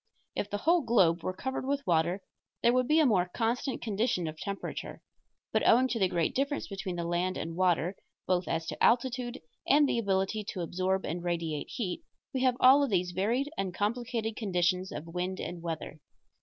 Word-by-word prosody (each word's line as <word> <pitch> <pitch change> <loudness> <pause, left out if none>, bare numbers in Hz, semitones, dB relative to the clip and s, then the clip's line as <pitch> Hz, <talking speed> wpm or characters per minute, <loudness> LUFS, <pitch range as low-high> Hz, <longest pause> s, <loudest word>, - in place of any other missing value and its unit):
If 205 - -2
the 205 - -2
whole 335 +10 +3
globe 190 - +3
were 185 - -2
covered 265 +9 -4
with 280 +1 -1
water 175 +2 +1 0.4
there 235 - +5
would 255 -1 +2
be 310 +3 +4
a 310 - +5
more 185 -8 +3
constant 240 +3 -1
condition 215 -4 0
of 155 - -5
temperature; 200 +5 -6 0.5
but - - +2
owing 255 +3 +6
to 235 - -1
the 190 - +4
great 170 -2 0
difference 280 +2 -1
between 195 -2 -4
the 170 - -2
land 175 +2 -1
and 165 +1 -4
water, 180 0 +2 0.3
both 180 -1 +1
as 165 0 -1
to - - -4
altitude 245 0 +2 0.3
and 290 0 +5
the 235 - +1
ability 195 0 0
to 185 - -4
absorb 185 +3 -1
and 170 +3 -3
radiate 165 -4 -2
heat, 235 - -3 0.3
we 260 - -1
have 255 -1 +3
all 265 +3 +7
of 280 - +1
these 180 -3 +1
varied 235 - 0
and 185 -2 -2
complicated 225 +1 -1
conditions 185 -3 0
of 150 - -6
wind 180 +2 -3
and 175 -1 -5
weather. 160 -2 -5
195 Hz, 195 wpm, -30 LUFS, 175-245 Hz, 0.5 s, all